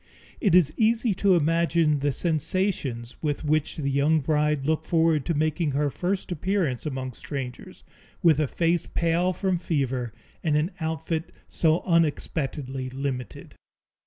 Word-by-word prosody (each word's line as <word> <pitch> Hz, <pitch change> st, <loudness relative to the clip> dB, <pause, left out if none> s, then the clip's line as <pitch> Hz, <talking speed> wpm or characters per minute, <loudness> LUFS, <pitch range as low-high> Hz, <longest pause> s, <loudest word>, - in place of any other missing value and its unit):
It 195 Hz, -6 st, +3 dB
is 155 Hz, -5 st, +5 dB
easy 225 Hz, 0 st, +2 dB
to 190 Hz, 0 st, +3 dB
imagine 165 Hz, -1 st, +2 dB
the 145 Hz, +1 st, +1 dB
sensations 155 Hz, -, -1 dB
with 150 Hz, 0 st, -2 dB
which 155 Hz, 0 st, 0 dB
the 140 Hz, -3 st, -1 dB
young 145 Hz, +3 st, +3 dB
bride 150 Hz, -1 st, +1 dB
looked 155 Hz, +1 st, 0 dB
forward 160 Hz, -4 st, +2 dB
to 170 Hz, -, 0 dB
making 155 Hz, 0 st, 0 dB
her 145 Hz, 0 st, +1 dB
first 185 Hz, +4 st, -2 dB
appearance 175 Hz, -6 st, -1 dB
among 130 Hz, -2 st, -4 dB
strangers, 130 Hz, -1 st, -7 dB, 0.4 s
with 160 Hz, -4 st, +5 dB
a 155 Hz, -, +2 dB
face 170 Hz, +3 st, 0 dB
pale 170 Hz, +2 st, +1 dB
from 185 Hz, -1 st, -1 dB
fever 130 Hz, -8 st, -1 dB, 0.3 s
and 150 Hz, -2 st, +2 dB
an 155 Hz, +5 st, 0 dB
outfit 160 Hz, +1 st, -3 dB, 0.2 s
so 160 Hz, 0 st, +2 dB
unexpectedly 145 Hz, -5 st, -1 dB
limited. 130 Hz, -3 st, -5 dB
155 Hz, 140 wpm, -25 LUFS, 140-170 Hz, 0.4 s, is